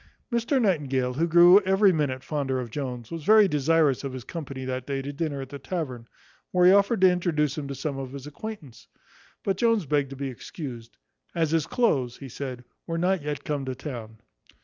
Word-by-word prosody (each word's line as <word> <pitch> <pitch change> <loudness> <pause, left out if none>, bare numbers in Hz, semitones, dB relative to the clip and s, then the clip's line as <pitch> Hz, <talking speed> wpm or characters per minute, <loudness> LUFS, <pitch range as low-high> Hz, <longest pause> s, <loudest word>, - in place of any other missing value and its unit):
Mr 235 +4 +1
Nightingale, 140 - +1
who 165 +6 0
grew 175 +3 +8
every 195 +1 +4
minute 135 -5 -1
fonder 135 -4 -2
of 120 -3 -6
Jones, 125 -4 -5
was 165 -2 -5
very 215 +3 +6
desirous 150 -3 +2
of 135 -2 -4
his 130 -2 -6
company 135 -4 -6
that 130 -1 -4
day 140 -1 -2
to 140 +2 -5
dinner 145 -2 -3
at 135 - -8
the 140 - -8
tavern, 130 -7 -5 0.4
where 180 -1 +3
he 180 - +8
offered 200 +2 +3
to 185 -1 +7
introduce 155 -5 0
him 150 -3 -5
to 140 - -5
some 135 0 -4
of 135 -1 -6
his 140 -1 -8
acquaintance; 150 - -9 0.6
but 195 - 0
Jones 230 -6 +2
begged 145 -1 +1
to 135 - -8
be 135 0 -4
excused, 120 -2 -8 0.4
"as 165 -3 +1
his 165 -3 +1
cloaths," 135 - +1
he 135 - -9
said, 125 -1 -6 0.2
"were 165 - -2
not 180 +1 +1
yet 145 -1 -4
come 145 -2 -2
to 130 -1 -4
town." 120 -5 -7
145 Hz, 205 wpm, -26 LUFS, 130-175 Hz, 0.6 s, grew